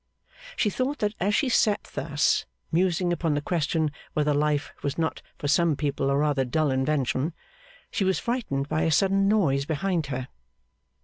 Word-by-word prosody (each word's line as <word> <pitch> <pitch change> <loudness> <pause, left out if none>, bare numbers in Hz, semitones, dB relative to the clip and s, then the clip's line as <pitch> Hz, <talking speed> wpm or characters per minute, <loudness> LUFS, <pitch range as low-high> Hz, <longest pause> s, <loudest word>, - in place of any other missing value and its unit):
She 210 - +1
thought 260 +7 -1
that 210 0 0
as 200 +3 +1
she 295 - +2
sat 215 -4 +2
thus, 145 +1 +1 0.2
musing 175 +1 +2
upon 165 -3 0
the - - +1
question 160 -1 0 0.2
whether 150 -1 +2
life 145 0 0
was 140 - -2
not 160 -1 -1 0.2
for 145 - -3
some 160 +2 +3
people 140 -1 -1
a 140 - +2
rather 145 -2 +2
dull 145 +3 +1
invention, 135 +3 0 0.6
she 200 - 0
was 190 -3 +2
frightened 205 - -2
by 155 - 0
a 160 - +2
sudden 195 +5 +3
noise 155 -10 +2
behind 165 +1 -1
her. 130 -1 -4
155 Hz, 170 wpm, -26 LUFS, 145-190 Hz, 0.6 s, some